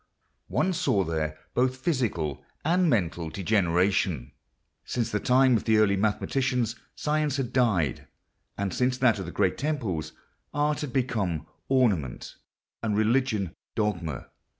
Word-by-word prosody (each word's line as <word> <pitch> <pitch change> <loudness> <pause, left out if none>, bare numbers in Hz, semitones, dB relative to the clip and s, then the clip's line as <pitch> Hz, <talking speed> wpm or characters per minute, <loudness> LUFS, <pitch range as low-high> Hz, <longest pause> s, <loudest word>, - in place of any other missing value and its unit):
One 185 - +1
saw 125 - +2
there 80 -2 -2 0.2
both 130 +1 +1
physical 115 - -1 0.2
and 175 +2 +3
mental 85 - 0
degeneration. 90 - +1 0.5
Since 115 +6 -2
the 105 - 0
time 130 +1 +4
of 110 - -1
the 110 -1 +4
early 105 -2 +4
mathematicians 120 +3 0 0.2
science 150 -2 0
had 125 -3 -3
died; 100 - +1 0.5
and 100 -2 -2
since 125 0 +1
that 125 -5 +3
of 95 - -5
the - - -5
great 95 - +1
temples 110 - -2 0.4
art 150 0 +1
had 145 -4 -4
become 105 - -1 0.2
ornament, 105 - +1 0.5
and 105 -2 0
religion 110 -5 +1 0.2
dogma. 90 - -2
110 Hz, 130 wpm, -27 LUFS, 90-130 Hz, 0.5 s, time